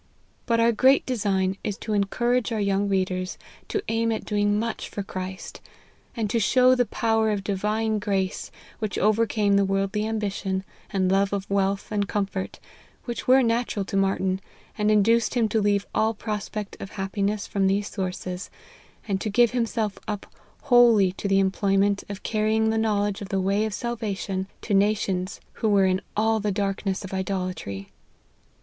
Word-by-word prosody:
But 230 -2 +2
our 230 +1 +5
great 260 +4 +4
design 195 -6 0
is 205 -1 -3
to 215 - -4
encourage 240 +4 +1
our 220 - -1
young 200 0 +1
readers 185 -1 -1 0.3
to 415 - -2
aim 230 0 +1
at 220 - -3
doing 205 -1 +1
much 230 +1 -3
for 200 - -4
Christ; 185 0 -7 0.6
and 225 -2 0
to 230 - +2
show 255 +3 +5
the 245 -2 +2
power 225 -1 +1
of 205 -2 -1
Divine 210 +2 0
grace 195 -2 -1 0.3
which 215 -2 -3
overcame 215 -1 +2
the 200 - +4
worldly 195 +2 0
ambition, 200 -3 -2 0.3
and 190 -2 +1
love 195 +1 +2
of 200 0 -2
wealth 200 0 0
and 205 -1 0
com 205 -1 +1
fort, 195 -1 -6 0.5
which 240 -1 -5
were 260 +1 +6
natural 230 -3 0
to 195 - -5
Martyn, 195 -1 +1 0.3
and 210 0 +1
induced 225 +3 +3
him 235 -2 +3
to 220 +1 +1
leave 205 -1 +2
all 220 +1 +1
prospect 210 -1 -4
of 195 - -8
happiness 200 +1 -2
from 195 -1 0
these 200 +1 +1
sources, 185 0 -4 0.6
and 195 -2 -1
to 215 - -1
give 235 +3 +4
himself 230 -4 -1
up 210 -2 -3 0.4
wholly 235 -7 +6
to 190 - -5
the 195 0 +3
em 190 -1 +2
ployment 200 0 +1
of 200 -1 -7
carrying 220 0 +1
the 225 - 0
knowledge 205 -2 0
of 200 - -6
the 195 - 0
way 200 +3 +1
of 215 - -3
salvation 205 -5 -3 0.2
to 210 - -2
nations 195 -2 +1 0.2
who 220 - +2
were 200 -2 +4
in 185 0 +1 0.2
all 220 +1 +2
the 210 0 -1
darkness 195 -1 -2
of 195 - -8
idolatry. 180 - -3
205 Hz, 175 wpm, -25 LUFS, 195-220 Hz, 0.6 s, were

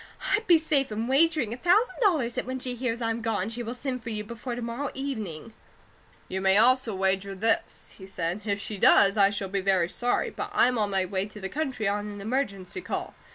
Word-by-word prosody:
I'd 445 +2 +1
be 345 -2 +7
safe 295 -5 0
in 220 +2 -2
wagering 285 -3 +3
a - - -6
thousand 365 - +3
dollars 310 - +2
that - - -3
when 260 0 -3
she 255 -1 -4
hears 245 -1 -3
I'm 225 0 -1
gone, 220 -3 -1
she 235 +2 -5
will 235 +1 -5
send 255 -1 -4
for 230 - -7
you 210 -1 -3
before 235 +3 -6
to 245 - -5
morrow 240 +5 -3
evening." 220 - -5 0.7
"You 190 +1 -3
may 190 +1 +4
also 245 -1 +4
wager 195 +1 0
this," 225 +4 -1
he 190 - -10
said. 180 +1 -3
"If 200 -2 -1
she 205 0 -5
does, 200 +1 +6
I 200 -2 +5
shall 200 -1 -4
be 195 0 -1
very 185 -3 +2
sorry, 245 +5 0
but - - -5
I'm 250 -1 +3
on 210 -1 +1
my 190 -1 +1
way 190 +1 -2
to 210 0 -12
the 195 -1 -5
country 265 -7 -2
on 205 +1 -1
an 205 -1 -7
emergency 205 - -3
call. - - -4
225 Hz, 225 wpm, -27 LUFS, 195-255 Hz, 0.7 s, be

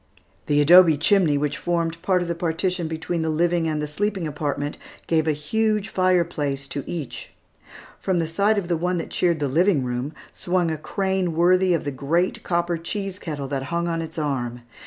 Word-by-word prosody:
The 145 0 +3
adobe 165 0 +7
chimney, 165 -2 +3
which 145 0 -1
formed 170 -1 -1
part 185 -2 +2
of - - -6
the 170 - -1
partition 170 +1 -1
between 160 +1 -3
the 160 - -1
living 170 +1 +1
and 155 -1 -1
the 150 - -1
sleeping 195 +3 -2
apartment, 145 -1 -3 0.3
gave 160 -1 +1
a - - +4
huge 210 +8 0
fireplace 170 -7 +1
to 140 - -4
each. 160 -7 -6 0.7
From 190 -2 0
the 165 - +1
side 200 +7 +1
of 195 -4 -1
the 170 - +1
one 180 +2 0
that 165 - -5
cheered 170 -3 +1
the 145 - 0
living 165 +1 +2
room, 125 +4 -3 0.2
swung 175 -2 0
a 160 - -2
crane 190 +1 -1
worthy 180 +1 +4
of 165 - -2
the 145 - -3
great 155 +7 0
copper 170 -1 0
cheese 195 +2 -4
kettle 145 -6 -5
that 135 -1 -2
hung 170 0 -1
on 165 -1 -1
its 160 0 -7
arm. 125 -5 -2
165 Hz, 195 wpm, -23 LUFS, 150-180 Hz, 0.7 s, adobe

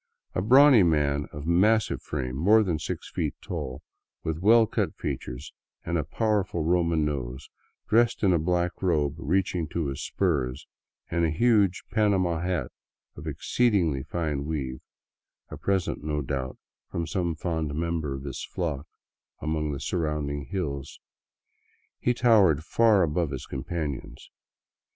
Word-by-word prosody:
A - - 0
brawny 130 +3 +7
man 75 -4 +2
of 75 0 -7
massive 105 +6 +3
frame, 65 -4 -4
more 105 +10 +5
than 85 -6 -1
six 75 - -5
feet - - -2
tall, 75 -7 -5 0.4
with 80 0 -2
well 110 +5 +6
cut - - -2
features 60 +4 -5 0.3
and 85 - -1
a 80 - +1
powerful 100 0 0
Roman 85 -2 +2
nose, 65 -3 -4 0.4
dressed 115 +1 +3
in 95 -2 +5
a 85 - +3
black 90 +2 -1
robe 75 -7 +1
reaching 90 +1 0
to 80 -2 -2
his 70 - -5
spurs, 70 -8 -1 0.5
and 85 0 +1
a 80 - +3
huge 100 +1 +3
" - - -37
panama 95 -6 +2
" - - -5
hat 90 -1 -2 0.4
of 75 +2 -9
exceedingly 85 - +1
fine 75 -2 -2
weave 65 -5 -3 0.4
— - - -56
a - - -6
present, 95 -6 -1
no 75 -1 -1
doubt, 65 -1 -3 0.3
from 85 - -2
some 85 +1 -1
fond 80 -2 -2
member 80 -3 -2
of 65 - -7
his 70 -3 -5
flock 80 -4 -3 0.5
among 75 -1 -1
the 70 - -4
surrounding 75 -4 -2
hills 70 -8 -4 0.5
— - - -41
he 125 - +1
towered 100 - +4
far 110 +1 +4
above 80 0 0
his 65 -3 -5
companions. 70 0 -5
80 Hz, 150 wpm, -27 LUFS, 75-95 Hz, 0.5 s, brawny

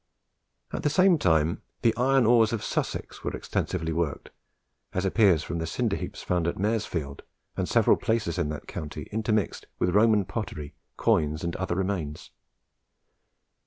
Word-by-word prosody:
At - - -2
the 150 - +2
same 185 +2 +4
time, 80 - +2 0.2
the 115 -1 +4
iron 130 +1 +3
ores 115 -1 +5
of 115 -3 -2
Sussex - - -3
were - - -2
extensively 80 -3 -2
worked, 80 -2 -2 0.6
as 95 +1 -1
appears 95 -5 +4
from 85 - -4
the 80 - -2
cinder - - 0
heaps - - -6
found 90 -2 0
at 85 - 0
Maresfield 95 -9 -2 0.3
and - - -2
several - - +4
places 105 -7 -1
in 75 - 0
that 75 -1 -6
county, 75 -1 -6
intermixed 110 -2 -1
with 90 - +1
Roman 105 -1 +4
pottery, 75 -11 -5 0.2
coins, 75 +1 +1
and 85 0 -2
other 95 -2 -2
remains. 90 -6 -3
95 Hz, 155 wpm, -27 LUFS, 80-110 Hz, 0.6 s, ores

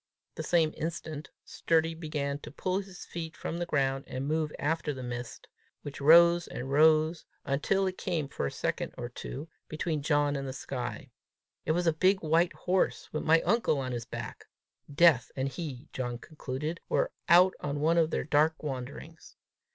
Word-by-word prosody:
The - - -5
same 165 -3 +2
instant 160 -2 -5 0.2
Sturdy 165 0 +1
began 150 -3 -3
to - - -9
pull 185 +1 -1
his 195 -2 -9
feet 165 -1 -6
from 170 - -4
the 175 - -2
ground, 135 -2 0
and 130 +1 -4
move 155 0 0
after 155 -1 -1
the 130 - -7
mist, 120 0 -6 0.4
which 145 0 -7
rose 170 +3 +7
and 130 +2 -6
rose 155 +2 +4 0.2
until 150 +8 +1
it 185 -1 -3
came 165 -6 -1
for 105 - -3
a - - -4
second - - -3
or 120 - -5
two 135 +4 -7 0.2
between 155 -1 -2
John 145 -1 +2
and 135 -1 -3
the 130 - -4
sky: 125 -2 -5 0.5
it 155 - +2
was 175 +1 0
a 165 - +4
big 190 +4 +2
white 165 +3 +3
horse, 185 +1 0
with 155 - -1
my 160 +1 +4
uncle 225 -9 +2
on 130 -2 -3
his 120 -1 -4
back: - - -7 0.5
Death 145 -4 +5
and 135 +1 -1
he, 140 -4 -6
John 120 -2 -3
concluded, 150 +3 -5
were - - +1 0.2
out 180 +2 +7
on 145 0 -3
one 165 +3 +3
of 160 -1 +3
their - - -1
dark 155 +2 +2
wanderings! 145 +4 -7
155 Hz, 180 wpm, -30 LUFS, 140-165 Hz, 0.5 s, rose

